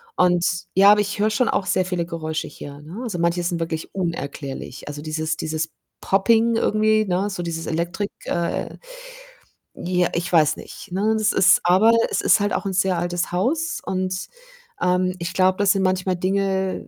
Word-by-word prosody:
und 175 -1 +3 0.3
ja, 200 +2 +7
aber 210 0 +5
ich 205 0 -4
höre 215 +1 +3
schon 230 +3 +1
auch 190 - 0
sehr 185 0 +1
viele 180 -2 -2
Geräusche 160 -1 -4
hier, 145 0 -10
ne? 170 +9 -9
Also, 200 -8 -4
manche 170 +1 +1
sind 170 -1 -1
wirklich 160 -1 -4
unerklärlich. 145 -8 -5
Also, 145 0 -6
dieses 155 +1 -3
dieses 160 0 -3 0.3
Popping 225 +4 +3
irgendwie, 215 -1 +2
ne, 190 +2 0
so 190 -3 -5
dieses 165 -1 -4
Elektrik 175 +5 -2
äh, 170 -1 -2 1.0
ja, 180 0 0
ich 175 +1 -2
weiß 155 -3 +4
nicht, - - -11
ne? 205 +4 +1
Es 215 -1 +2
ist 185 -1 +5
aber 190 +6 +5 0.2
es - - 0
ist - - +4
halt 205 0 0
auch - - -2
'n 195 - -1
sehr 185 -1 +1
altes 175 0 -2
Haus 310 - -1
und, 185 0 -3 0.5
ähm, 180 0 +1
ich 170 +1 -4
glaube, 185 0 +3
das 205 -1 +3
sind 195 - 0
manchmal 185 0 0
Dinge, 190 +1 -1
185 Hz, 180 wpm, -22 LUFS, 170-200 Hz, 1.0 s, ja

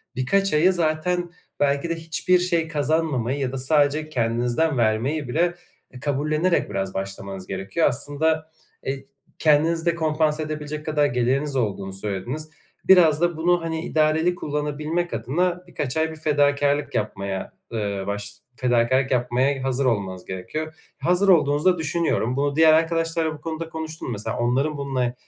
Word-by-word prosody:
birkaç 195 +10 +1
ayı, 175 +5 +4
zaten, 175 +1 0 0.3
belki 140 +3 +1
de 165 - 0
hiçbir 165 +3 +2
şey 170 -2 0
kazanmamayı 145 -4 0
ya 130 -2 -1
da 135 - -4
sadece 150 +2 +2
kendinizden 120 +4 0
vermeyi 120 +7 +1
bile 175 +6 +1 0.4
e 125 - -11
kabullenerek 150 +5 0
biraz 95 -1 -3
başlamanız 95 -1 -6
gerekiyor. 95 - 0
Aslında, 155 +4 -1 0.3
eee, 135 0 -3 0.3
kendinizi 160 +2 +3
de 170 -1 +2
kompanse 155 -1 +1
edebilecek 150 0 -5
kadar 150 -2 +2
geliriniz 135 +4 0
olduğunu 100 -5 -2
söylediniz. 105 +11 -4 0.4
Biraz 170 -5 +6
da 175 -2 +1
bunu, 175 +1 +2
hani, 165 +1 -3
idareli 160 +3 +2
kullanabilmek 150 +3 -2
adına 175 +10 -1
birkaç 150 -4 -3
ay 160 0 +1
bir - - -8
fedakârlık 145 -1 +1
yapmaya, 100 -2 -3 0.2
ııı, 100 -3 -2
baş 100 0 -4 0.2
fedakârlık 125 +2 +2
yapmaya 130 +2 +1
hazır 135 0 0
olmanız 95 -6 -1
gerekiyor. 155 +13 -5 0.2
Hazır 180 +3 +2
olduğunuzu 155 0 +4
da - - -7
düşünüyorum. 150 -8 0
Bunu 140 0 0
diğer 160 0 +6
arkadaşlarla 165 0 +1
bu 150 - -11
konuda 165 +1 -5
konuştun 160 -1 -6
mu? - - -2
Mesela, 105 0 -4
onların 135 +6 0
bununla 130 -3 -1
150 Hz, 145 wpm, -23 LUFS, 125-160 Hz, 0.4 s, Biraz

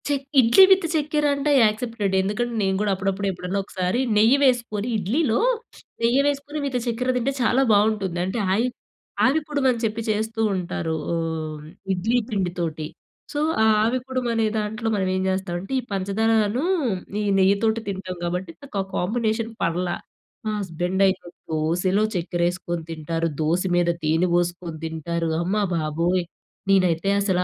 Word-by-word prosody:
Check 285 -1 0 0.2
idli 245 +10 +7
with 380 -2 +5
చక్కెర 300 -1 0
అంటే 280 +1 0
accepted 215 -2 0
ఎందుకంటే 210 +5 -1
నేను 190 -1 +1
కూడా 210 -1 +1
అప్పుడప్పుడు 195 +1 -2
ఎప్పుడన్నా 180 +2 -3
ఒకసారి 185 +3 -1 0.2
నెయ్యి 225 +6 +5
వేసుకొని 235 -5 +1
ఇడ్లీలో 225 - +1 0.6
నెయ్యి 240 +4 +4
వేసుకొని 285 +1 -2
విత్ 265 -3 -1
చక్కెర 245 +2 0
తింటే 250 +3 0
చాలా 245 +3 +3
బావుంటుంది 205 -4 +1
అంటే 190 +5 -2
ఆయి 225 +5 +2 0.6
ఆవిరి 275 +5 +4
కుడుమని 265 -5 +1
చెప్పి 225 0 -1
చేస్తూ 220 +1 -1
ఉంటారు. 170 -3 -3 0.2
ఓహ్, 160 -2 -3 0.3
ఇడ్లీ 215 +7 +1
పిండితోటి. 175 -6 -2 0.5
సో 290 - -1 0.2
ఆ - - +5 0.2
ఆవి 235 +4 +1
కుడుమనే 240 -4 0
దాంట్లో 215 +1 -3
మనం 190 -2 0
ఏం 185 - 0
చేస్తామంటే 190 +2 -3
ఈ - - -3
పంచదారను, 215 +4 +1 0.6
ఈ - - -1 0.2
నెయ్యి 190 +1 +5
తోటి 225 0 +2
తింటాం 190 -1 -5
కాబట్టి 175 0 -3
నాకు 275 -7 -7
ఆ - - -2
కాంబినేషన్ 225 +3 -1
పర్ల. 175 +2 0 0.6
మా 215 - 0
హస్బెండ్ 180 0 -2
అయితే 190 -1 -1 0.3
దోసలో 175 +6 +1
చక్కెరేసుకొని 175 -1 -1
తింటారు 165 +1 -2
దోస 165 +4 +1
మీద 175 -1 +2
తేనె 160 +4 +2
పోసుకొని 175 -1 -1
తింటారు 165 +1 -2
అమ్మబాబోయ్! 175 -2 0 0.5
నేనైతే 185 -1 +3
అసలా 185 -3 +1
195 Hz, 140 wpm, -23 LUFS, 175-230 Hz, 0.6 s, ఇడ్లీ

